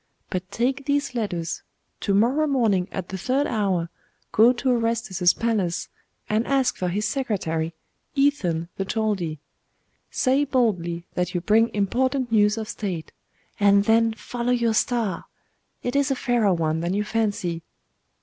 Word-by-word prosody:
But 185 0 -3
take 260 +4 -1
these 285 -1 0
letters; 180 -8 -3 0.4
to 200 - 0
morrow 260 +9 +3
morning 220 -10 +2
at 185 -2 -5
the 190 - -5
third 265 +8 +1
hour 190 -8 0 0.4
go 225 +3 +6
to 255 +1 -1
Orestes's 230 -6 +2
palace, 205 -7 -1 0.4
and 215 +2 0
ask 270 -2 +2
for 180 - -2
his 205 +4 -1
secretary, 165 - -2 0.4
Ethan 200 - +1
the 195 - 0
Chaldee. 195 -7 -1 0.7
Say 265 +2 +2
boldly 180 -11 0
that 180 0 -2
you 175 - 0
bring 220 +5 +3
important 250 +5 0
news 210 -1 +4
of 220 -1 -4
state; 185 -8 -4 0.5
and 200 -1 +5
then 225 0 +4
follow 240 +2 -3
your 235 -2 +2
star: 220 -5 0 0.6
it 245 - -2
is 280 0 +2
a 270 - +1
fairer 240 -5 +2
one 160 -1 0
than 170 +3 -1
you 205 - +1
fancy. 205 -6 -1
215 Hz, 150 wpm, -24 LUFS, 180-245 Hz, 0.7 s, go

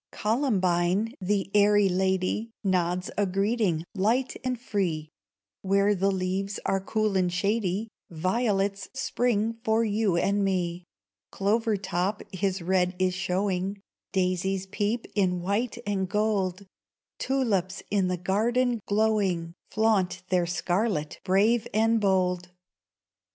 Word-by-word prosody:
Columbine, 205 -3 +1
the 195 +1 0
airy 205 0 +5
lady, 190 +4 0
Nods 180 -2 0
a 205 - +2
greeting, 195 -3 0
light 225 +6 +1
and 255 -2 -2
free; 175 -9 -2 0.5
Where 200 +1 +3
the 195 0 +1
leaves 190 +1 -2
are 195 0 +1
cool 215 0 0
and 180 -2 +2
shady, 200 +2 0 0.2
Violets 195 +2 0
spring 230 -4 0
for 220 0 +2
you 205 -4 +1
and 200 +3 +1
me; 180 -2 -1 0.4
Clover 215 +2 +1
top 190 +2 -2
his 190 -1 -1
red 180 0 +1
is 185 0 +1
showing, 190 +1 -1 0.3
Daisies 190 0 0
peep 205 +4 -2
in 185 -3 +1
white 205 +7 -1
and 195 -2 -1
gold, 200 -2 0 0.5
Tulips 200 -9 0
in 195 -3 +2
the 180 0 -1
garden 235 +7 +1
glowing, 200 -6 +1 0.2
Flaunt 215 -5 +1
their 180 -2 +2
scarlet 175 -2 -1
brave 210 +5 +3
and 225 +1 +3
bold. 180 -2 +1
195 Hz, 120 wpm, -27 LUFS, 185-215 Hz, 0.5 s, airy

